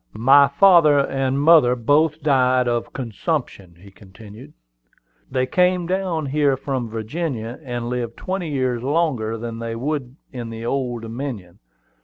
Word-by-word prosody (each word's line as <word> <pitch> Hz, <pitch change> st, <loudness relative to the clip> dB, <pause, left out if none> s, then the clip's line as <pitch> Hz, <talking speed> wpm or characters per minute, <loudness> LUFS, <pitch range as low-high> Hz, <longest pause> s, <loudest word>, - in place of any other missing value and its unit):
"My 135 Hz, +5 st, +6 dB
father 160 Hz, -1 st, +5 dB
and 135 Hz, -1 st, 0 dB
mother 145 Hz, -5 st, +5 dB
both 145 Hz, +5 st, +1 dB
died 130 Hz, -3 st, +2 dB
of 120 Hz, -1 st, -2 dB
consumption," 120 Hz, -, -4 dB
he 100 Hz, +2 st, -15 dB
continued. 105 Hz, +7 st, -14 dB, 0.8 s
"They 130 Hz, -1 st, 0 dB
came 180 Hz, +5 st, +1 dB
down 180 Hz, -3 st, -2 dB
here 140 Hz, -1 st, +1 dB
from 130 Hz, -3 st, -4 dB
Virginia, 115 Hz, +1 st, -4 dB
and 120 Hz, -4 st, -5 dB
lived 120 Hz, -1 st, -4 dB
twenty 185 Hz, -3 st, -4 dB
years 130 Hz, -4 st, -1 dB
longer 130 Hz, -6 st, -1 dB
than 115 Hz, 0 st, -6 dB
they 115 Hz, 0 st, -5 dB
would 135 Hz, 0 st, -4 dB, 0.2 s
in 120 Hz, -3 st, -6 dB
the 115 Hz, 0 st, -7 dB
Old 120 Hz, -2 st, -2 dB
Dominion. 115 Hz, -6 st, -7 dB
130 Hz, 140 wpm, -21 LUFS, 115-150 Hz, 0.8 s, My